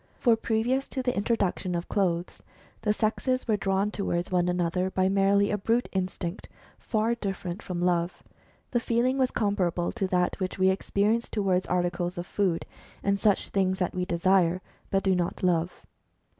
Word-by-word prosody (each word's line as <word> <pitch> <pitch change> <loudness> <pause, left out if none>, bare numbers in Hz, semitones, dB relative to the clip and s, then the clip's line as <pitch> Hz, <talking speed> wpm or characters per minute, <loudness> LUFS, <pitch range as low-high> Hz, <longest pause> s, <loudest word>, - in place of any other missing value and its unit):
For 235 -3 +4
previous 230 +4 0
to 260 - -4
the 250 -1 0
introduction 200 -4 0
of 170 +1 -3
clothes, 175 -3 -1 0.4
the 210 - +1
sexes 235 +5 0
were 220 - +3
drawn 195 +1 0
towards 180 -4 -2
one 180 -1 +2
another 180 +1 0
by 185 0 +1
merely 200 +1 +3
a 210 - 0
brute 230 +5 +1
instinct, 185 -1 -3 0.3
far 220 +1 0
dif 200 -5 -4
ferent 180 +3 -4
from 180 -2 -4
love. 175 -1 0 0.5
The 240 - +2
feeling 240 +3 +1
was 260 -1 +3
comparable 185 -5 0
to 205 -5 -2
that 180 0 0
which 185 -1 -3
we 190 0 +4
experience 210 +4 0
towards 190 -3 0
articles 175 0 -1
of 175 - -3
food 185 -3 0 0.4
and 200 0 +1
such 205 -1 +2
things, 190 -1 +1
that 180 -2 -1
we 180 0 -1
desire, 180 0 +2 0.3
but 195 0 +1
do 190 - +3
not 175 0 -2
love. 175 -1 0
190 Hz, 170 wpm, -27 LUFS, 180-215 Hz, 0.5 s, For